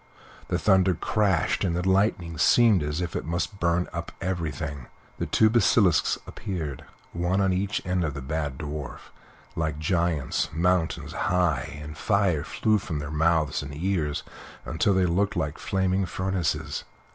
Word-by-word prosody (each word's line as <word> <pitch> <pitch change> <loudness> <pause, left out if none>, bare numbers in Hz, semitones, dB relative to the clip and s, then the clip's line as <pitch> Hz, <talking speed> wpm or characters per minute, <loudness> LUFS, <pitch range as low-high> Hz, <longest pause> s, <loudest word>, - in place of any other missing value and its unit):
The - - 0
thunder 95 -2 +3
crashed, 95 -3 +1
and 85 -3 0
the 90 +2 -1
lightning 95 -4 +1
seemed 110 +2 +5
as 75 +3 -2
if 85 -2 -4
it - - -2
must 85 +3 -3
burn 85 +1 +1
up 85 0 -5
everything; 80 -7 -3 0.3
the - - -1
two 110 - +4
basilisks 105 -6 +3
appeared, 80 - -5 0.3
one 90 +3 0
on 95 -1 +2
each 100 +3 -1
side 90 -1 0
of 75 -4 -2
the 70 - -5
bad 70 -1 -3
Dwarf, 75 -2 -6 0.4
like 80 -2 -1
giants, 85 -2 0
mountains 85 0 0
high, 80 -5 0
and 75 +1 -8
fire 95 -4 +1
flew 110 +5 +1
from 80 -5 -4
their 75 0 -5
mouths 80 -1 +2
and 70 0 -7
ears, 80 -3 -1 0.4
until 100 +4 +1
they 95 -1 +3
looked 95 +4 +1
like 80 -5 -2
flaming 95 0 0
furnaces. 85 -7 -2
85 Hz, 155 wpm, -26 LUFS, 75-95 Hz, 0.4 s, seemed